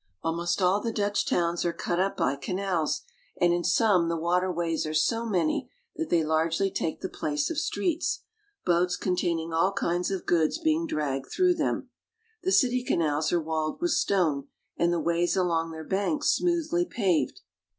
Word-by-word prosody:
Almost 170 +3 -1
all 190 +3 +3
the 230 - -2
Dutch 205 -1 0
towns 170 0 +1
are 175 - +1
cut 175 +1 -2
up 195 +1 0
by 135 - +1
canals, 180 +2 -1 0.4
and 175 0 +4
in 175 0 0
some 185 -7 +3
the 170 - 0
water 180 +3 +1
ways 165 -2 -1
are 155 - -3
so 230 +9 +1
many 175 -7 0 0.3
that 325 - -3
they 170 -2 +3
largely 160 +5 +1
take 160 - -3
the - - -2
place 150 - -2
of 320 - -1
streets, 340 -3 -1 0.4
boats 180 0 +2
containing 170 -3 -1
all 165 +4 +3
kinds 175 -2 0
of 195 -2 -3
goods 165 - +2
being 325 0 +1
dragged 140 - -2
through 365 -1 +3
them. - - -2 0.5
The 370 +1 0
city 250 -6 +3
canals 155 -7 0
are 175 - +3
walled 155 -1 -2
with 345 0 0
stone 160 - +1 0.3
and 170 0 +2
the 175 - +1
ways 170 +1 +1
along 165 -3 +1
their 160 -1 -7
banks 200 - 0
smoothly 345 0 +1
paved. 185 - 0
175 Hz, 175 wpm, -27 LUFS, 165-205 Hz, 0.5 s, and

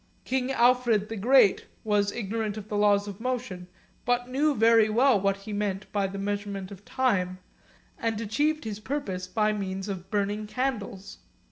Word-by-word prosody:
King 260 0 -1
Alfred 240 -4 +3
the 225 - -4
Great 225 0 +4 0.2
was 205 -1 +1
ignorant 220 -1 -3
of 215 0 -8
the 210 - -3
laws 205 0 +3
of 200 -1 -7
motion, 235 -8 -3 0.4
but 245 0 0
knew 285 +3 +1
very 225 0 +5
well 235 -1 +4
what 195 0 +1
he 205 +2 -8
meant 205 -2 -2
by 200 -2 0
the 195 +1 -7
measurement 200 -1 -4
of 200 0 -11
time, 195 -8 0 0.6
and 225 -2 -1
achieved 295 +8 0
his 215 -2 -5
purpose 210 -8 -4
by 215 +3 +1
means 195 -1 -4
of 190 -3 -6
burning 205 +1 -1
candles. 210 -6 -4
210 Hz, 165 wpm, -27 LUFS, 200-240 Hz, 0.6 s, very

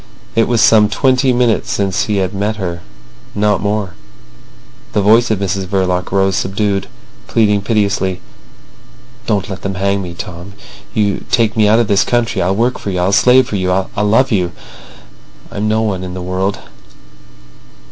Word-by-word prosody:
It 115 0 +3
was 120 -2 +1
some 105 -2 +5
twenty 130 +3 +2
minutes 120 -1 +1
since 100 -6 0
he 105 -2 -1
had 95 -1 -1
met 100 +2 -1
her—not 95 - -4
more. 100 -3 -2 1.0
The 105 - +2
voice 115 +4 +4
of 110 - +1
Mrs 95 -1 -2
Verloc 90 -2 -1
rose 95 0 +1
subdued, 100 0 -1 0.4
pleading 105 -3 +2
piteously: 100 -3 0 1.1
"Don't 100 -3 0
let 95 -2 -7
them 95 0 -4
hang 100 +1 0
me, 90 -2 -7
Tom! 90 +3 -8 0.8
Take 115 -2 +1
me 110 -2 +3
out 110 +2 +4
of 115 -2 +2
the 100 - +1
country. 115 -1 +1
I'll 95 +2 +1
work 120 +4 0
for - - -5
you. 90 -2 -2
I'll 90 +2 +1
slave 125 +4 +5
for 105 - -3
you. 95 -1 -1
I'll 95 +1 0
love 115 +6 +2
you. 90 -5 0 1.0
I've 100 - -5
no 110 +1 +1
one 95 -4 -2
in 90 0 -6
the 90 - -5
world. 95 +2 -2
100 Hz, 165 wpm, -15 LUFS, 95-110 Hz, 1.1 s, some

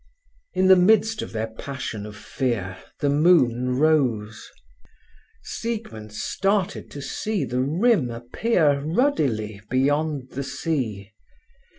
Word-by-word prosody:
In 190 - +3
the 190 - +9
midst 215 +4 +3
of - - -6
their 110 -1 -2
passion 110 -5 -6
of 105 - -10
fear 110 -5 -2 0.3
the 145 - +2
moon 130 -6 +3
rose. 125 -8 +1 0.9
Siegmund 210 - -5
started 195 - -1
to 145 - -8
see 215 +5 -2
the 125 +1 -1
rim 160 - +2
appear 140 - +1
ruddily 140 - 0
beyond 145 +1 0
the 140 - -4
sea. 130 - -3
140 Hz, 110 wpm, -24 LUFS, 115-175 Hz, 0.9 s, the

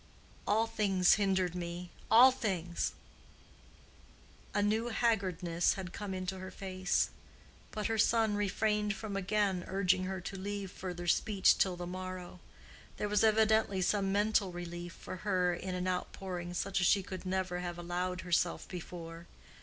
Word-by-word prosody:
All 220 +2 +3
things 195 -5 +3
hindered, 190 -4 +1
me—all 180 +8 +3
things." 180 -9 -2 1.6
A 205 - +1
new 220 +3 +1
haggardness 185 -7 +1
had 185 -2 -6
come 200 -2 -4
in 185 0 -4
her 185 0 -6
face, 185 -1 -1 0.6
but 210 -1 -4
her 225 -1 0
son 225 -1 +3
refrained 210 0 0
from 200 +1 -5
again 195 -1 0
urging 190 -1 +2
her 190 0 -3
to 185 +2 -6
leave 200 -1 -4
further 175 -2 -6
speech 195 +3 +3
till 185 -2 +2
the 175 0 -5
morrow: 185 0 -6 0.6
there 210 - -2
was 210 0 +3
evidently 220 -2 +3
some 195 +1 +1
mental 205 -1 +2
relief 175 0 -6
for - - -8
her 185 -3 +1
in 185 +1 -4
an 180 0 -2
outpouring 180 -1 -4
such 195 +1 0
as 180 - +4
she 200 -2 +4
could 185 0 -7
never 185 -1 -1
have 175 -1 -4
allowed 180 +1 -2
herself 175 -1 0
before. 170 -1 -8
185 Hz, 145 wpm, -33 LUFS, 180-205 Hz, 1.6 s, as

